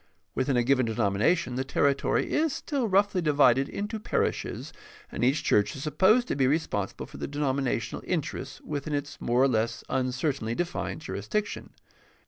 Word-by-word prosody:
Within 130 0 +1
a 120 - +3
given 130 -1 +3
denomination 115 - +1
the 130 - 0
territory 140 +1 +1
is 310 -2 +2
still 275 -6 -2
roughly 200 -1 +2
divided 140 -4 +4
into 210 +2 -4
par 215 - 0
ishes, - - -3 0.4
and - - -3
each 135 +5 +2
church 105 0 +2
is 135 - -6
supposed 190 - +3
to - - 0
be 135 -2 +2
responsible 130 - -1
for - - -12
the - - -4
denominational 135 -5 -1
interests 150 -5 -3
within 145 0 -3
its 145 +1 -5
more 120 +2 +2
or - - +5
less 115 -1 0
uncertainly 130 -2 -1
defined 175 -1 -3
jurisdiction. 205 - -3
140 Hz, 160 wpm, -27 LUFS, 125-165 Hz, 0.4 s, or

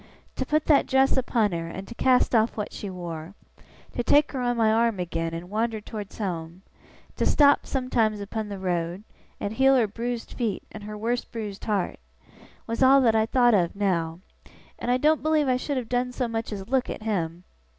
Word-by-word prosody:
To 260 - -2
put 305 0 +1
that 295 -3 +4
dress 265 0 +3
upon 235 -5 +1
her, 165 -1 -3
and 190 +3 -7
to - - -8
cast 255 +1 +3
off 225 0 +2
what 210 - -4
she 205 - -6
wore 175 -1 -7 0.6
to 240 - -1
take 290 +4 +4
her 265 - -3
on 245 -1 0
my 220 -1 +3
arm 225 -2 +2
again, 165 -1 -2
and 165 +2 -6
wander 220 +2 -1
towards 210 -1 -8
home 175 -3 -4 0.5
to - - 0
stop 285 -1 +4
sometimes 235 -5 0
upon 210 +1 -4
the 200 - -5
road, 175 0 -2 0.4
and 205 - -3
heal 270 +3 +4
her 245 -3 +4
bruised 235 +3 -4
feet 225 -5 -2
and 210 -1 -9
her 210 0 -6
worse 235 +3 -1
bruised 210 -4 -7
heart 205 -4 -1 0.7
was 230 +2 -4
all 265 +1 +7
that 230 -3 +3
I 220 0 +3
thowt 245 -1 +4
of 180 -4 +2
now. 175 -4 -1 0.6
I 245 +1 +1
doen't 305 +4 +3
believe 310 -1 +2
I 255 -1 +3
should 280 +2 -3
have 245 -3 -3
done 250 +1 0
so 250 0 -2
much 225 -1 -3
as 195 -2 -6
look 260 0 +1
at - - -6
him. 175 -5 -2
220 Hz, 200 wpm, -26 LUFS, 195-250 Hz, 0.7 s, all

